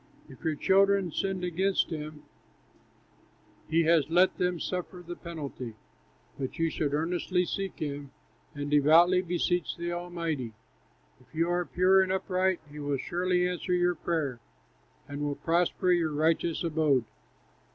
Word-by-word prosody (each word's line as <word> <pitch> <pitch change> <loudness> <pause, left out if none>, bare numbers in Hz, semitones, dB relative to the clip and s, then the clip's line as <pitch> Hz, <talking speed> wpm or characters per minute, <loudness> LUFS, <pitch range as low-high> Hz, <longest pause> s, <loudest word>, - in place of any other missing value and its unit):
If - - -15
your 160 -2 0
children 195 +1 +3
sinned 190 +3 -2
against 185 +2 +1
him, 150 -1 -6 1.5
He 165 +1 +3
has 160 -2 +3
let 180 +3 +4
them 180 -1 0
suffer 180 0 -4
the 175 +1 -6
penalty; 140 -10 -7 0.6
But 130 -2 -4
you 165 -1 +1
should 145 -2 -1
earnestly 180 +3 0
seek 195 +1 -4
him, 145 -2 -4 0.5
And 145 0 -4
devoutly 165 +5 +6
beseech 175 -1 -1
the 170 0 -3
Almighty. 165 -8 -3 0.7
If - - -22
you 165 +2 +1
are 175 0 0
pure 185 +6 +4
and 190 0 0
upright, 190 -1 0
He 150 +1 -10
will 145 -1 -1
surely 180 +4 0
answer 180 0 -2
your 180 0 +3
prayer, 155 -8 -2 0.7
And 145 0 -6
will 145 -1 -1
prosper 175 +3 +1
your 165 -3 +2
righteous 160 +2 +1
abode." 155 -6 +2
170 Hz, 140 wpm, -29 LUFS, 150-180 Hz, 1.5 s, devoutly